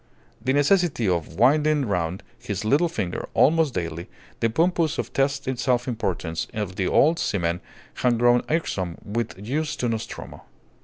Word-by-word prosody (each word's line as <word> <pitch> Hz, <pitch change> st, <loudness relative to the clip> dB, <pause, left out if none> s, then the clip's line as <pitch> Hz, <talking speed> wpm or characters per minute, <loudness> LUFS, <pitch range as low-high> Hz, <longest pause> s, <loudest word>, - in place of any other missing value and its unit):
The 130 Hz, -, +1 dB
necessity 145 Hz, -, +2 dB
of 85 Hz, -3 st, -1 dB
winding 145 Hz, -, +3 dB
round 90 Hz, -3 st, -2 dB, 0.2 s
his 100 Hz, 0 st, -4 dB
little 150 Hz, +10 st, +3 dB
finger, 100 Hz, -, -4 dB
almost 160 Hz, -2 st, +4 dB
daily, 85 Hz, -1 st, -4 dB, 0.3 s
the 115 Hz, -, +2 dB
pompous 165 Hz, +4 st, +1 dB
and -, -, -4 dB
testy 135 Hz, -1 st, 0 dB
self 120 Hz, 0 st, +1 dB
importance 95 Hz, -8 st, -2 dB
of 105 Hz, -4 st, -3 dB
the 95 Hz, -2 st, 0 dB
old 160 Hz, +3 st, +4 dB
seaman 85 Hz, -3 st, -1 dB, 0.3 s
had 120 Hz, -2 st, +1 dB
grown 120 Hz, +1 st, +4 dB
irksome 95 Hz, -, -1 dB
with 115 Hz, +2 st, -3 dB
use 140 Hz, +10 st, -2 dB
to 125 Hz, -, -1 dB
Nostromo. 115 Hz, -2 st, -5 dB
120 Hz, 150 wpm, -24 LUFS, 95-145 Hz, 0.3 s, almost